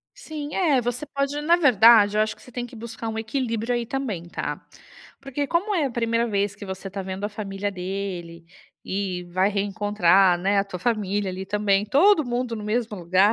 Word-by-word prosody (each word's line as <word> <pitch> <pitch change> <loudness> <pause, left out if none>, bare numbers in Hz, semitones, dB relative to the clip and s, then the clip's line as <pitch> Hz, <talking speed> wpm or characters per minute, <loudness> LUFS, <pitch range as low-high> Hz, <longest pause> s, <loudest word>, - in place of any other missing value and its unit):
Sim 305 -11 -7
é, 300 -9 +3
você 245 +4 -3
pode 280 +1 -2
na 335 +3 +4
verdade, 225 - +6
eu - - +3
acho 215 0 0
que - - -19
você 250 - -15
tem 245 0 -4
que 240 - -13
buscar 225 0 -6
um 220 0 -3
equilíbrio 230 0 -2
aí 240 -1 -2
também, 220 -11 -4
tá. - - -4 0.6
Porque 275 +1 -3
como 390 +7 0
é 310 -6 +2
a - - -3
1ª 230 0 0
vez 200 -2 0
que 200 - -10
você 190 +1 -6
tá 195 0 -5
vendo 190 +2 -5
a - - 0
família 205 -1 -4
dele, 180 -3 -5 0.4
e 190 -2 -3
vai 185 +3 +2
reencontrar, 195 -3 +3
né, 200 +2 +1
a 195 - +2
tua 185 -2 -7
família 205 -4 -1
ali 190 +1 -6
também, 205 0 +1
todo 310 - +5
mundo 245 -1 -2
no 210 - -6
mesmo 220 0 -1
lugar, 185 +5 +3
215 Hz, 205 wpm, -24 LUFS, 195-245 Hz, 0.6 s, verdade